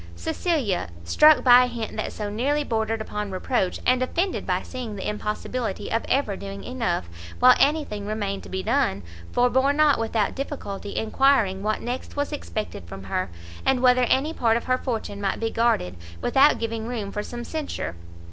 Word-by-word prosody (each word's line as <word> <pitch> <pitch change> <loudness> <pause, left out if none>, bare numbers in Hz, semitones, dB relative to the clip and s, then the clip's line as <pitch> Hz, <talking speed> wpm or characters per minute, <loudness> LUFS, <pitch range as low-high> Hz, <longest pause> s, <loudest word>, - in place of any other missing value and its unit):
Cecilia, 205 - -1
struck 300 - +6
by 250 0 +8
a - - -3
hint 235 -3 -5
that - - -3
so 210 - -4
nearly 270 +8 0
bordered 225 -3 -1
upon 210 -1 -4
reproach, 190 +1 -1
and 255 0 +3
offended 350 +9 -1
by - - 0
seeing 245 -5 -6
the 190 - -4
impossibility 210 +1 -3
of 225 - 0
ever 260 -7 +1
doing 195 0 -7
enough, 230 - -2 0.3
while 250 0 +8
anything 280 -9 +1
remained 205 -2 -2
to - - -12
be 190 0 -3
done, 215 - +1 0.3
forbore 260 +3 +3
not 300 -3 +4
without 225 -2 0
difficulty 210 -8 -5
enquiring 220 -5 +2
what 215 +1 -1
next 245 +2 -5
was 285 +1 -1
expected 215 - -5
from 95 +3 -8
her, 95 -1 -2 0.3
and 260 -1 +2
whether 250 0 +5
any 275 +6 +1
part 230 -6 +2
of 235 - -4
her 255 0 +1
fortune 220 -4 -4
might 195 -1 -1
be 225 0 -1
guarded, 225 - +1 0.2
without 275 - +4
giving 225 -1 -3
room 220 -5 -4
for 210 - -3
some 240 +3 -6
censure! 260 - -4
230 Hz, 175 wpm, -24 LUFS, 205-260 Hz, 0.3 s, by